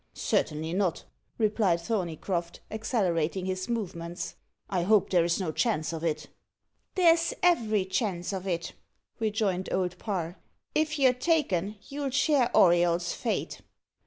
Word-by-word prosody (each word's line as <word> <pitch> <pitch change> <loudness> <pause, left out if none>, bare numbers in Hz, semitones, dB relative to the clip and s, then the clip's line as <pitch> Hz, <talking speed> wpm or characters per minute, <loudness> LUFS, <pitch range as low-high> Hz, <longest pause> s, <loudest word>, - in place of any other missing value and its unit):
"Certainly 160 +2 0
not," 185 -3 0 0.3
replied 210 -5 +2
Thorneycroft, 170 -3 -2
accelerating 190 -6 0
his 185 +1 -3
movements; 175 -7 -4 0.3
"I 185 -3 0
hope 205 +2 +3
there's 170 -1 +3
no 180 -5 -1
chance 165 -5 0
of 160 0 -5
it." 160 -2 -1 0.7
"There's 335 -3 +4
every 220 - +3
chance 190 -1 -1
of 190 0 -4
it," 170 -2 -2 0.5
rejoined 205 -4 0
Old 180 -1 -1
Parr. 180 -4 -3 0.4
"If 310 0 +1
you're 265 -3 +5
taken, 250 - +1
you'll 280 0 -3
share 280 -2 +3
Auriol's 175 -1 +4
fate." - - -3
190 Hz, 125 wpm, -28 LUFS, 170-230 Hz, 0.7 s, you're